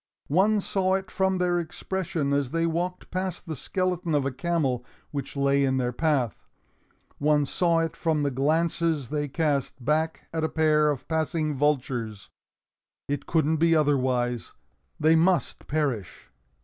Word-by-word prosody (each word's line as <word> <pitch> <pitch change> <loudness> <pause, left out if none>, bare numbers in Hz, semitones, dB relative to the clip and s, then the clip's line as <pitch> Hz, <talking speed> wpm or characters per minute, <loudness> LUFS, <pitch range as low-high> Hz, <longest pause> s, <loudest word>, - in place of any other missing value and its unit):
One 205 +4 +4
saw 190 -1 +1
it 190 0 -4
from 190 0 +1
their 175 -1 +1
expression 170 -3 -2
as 140 -2 +1
they 165 +3 0
walked 175 +2 -2
past 185 -1 -3
the 160 -3 -4
skeleton 180 +1 -1
of 140 -2 +1
a 135 - 0
camel 135 -4 -1 0.3
which 145 -1 -5
lay 140 0 +3
in 130 -1 +2
their 125 -1 0
path. 135 -4 -1 0.7
One 150 0 +3
saw 170 +3 +2
it 165 0 -2
from 160 -3 0
the 140 - +1
glances 155 +1 +1
they 145 0 -1
cast 140 -4 -1
back 155 +3 0
at 160 -1 -1
a 160 - +1
pair 155 -1 +3
of 145 -4 -3
passing 160 -1 0
vultures. 125 -7 -1 0.8
It 145 0 -3
couldn't 160 -1 +2
be 165 +1 +4
otherwise; 125 - +1 0.5
they 155 +1 +5
must 170 0 +1
perish! 135 - -2
155 Hz, 150 wpm, -26 LUFS, 140-170 Hz, 0.8 s, they